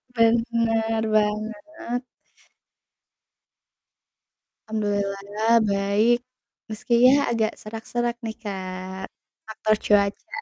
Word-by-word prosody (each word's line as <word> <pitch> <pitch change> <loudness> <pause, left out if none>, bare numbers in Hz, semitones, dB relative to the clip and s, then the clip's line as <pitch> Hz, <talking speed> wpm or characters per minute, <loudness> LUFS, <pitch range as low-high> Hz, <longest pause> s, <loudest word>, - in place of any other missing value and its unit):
Benar 230 -1 +2
banget. 220 +6 -2 2.6
Alhamdulillah 205 0 -1 0.2
baik, 200 +4 +3 0.5
meski 215 +2 -3
yah 280 +3 +5
agak 220 -2 +1
serak-serak 235 +2 -3
nih 220 -1 -4
Kak, 190 -1 -6 0.4
faktor 220 0 0
cuaca. 200 +6 +1
220 Hz, 70 wpm, -24 LUFS, 205-230 Hz, 2.6 s, yah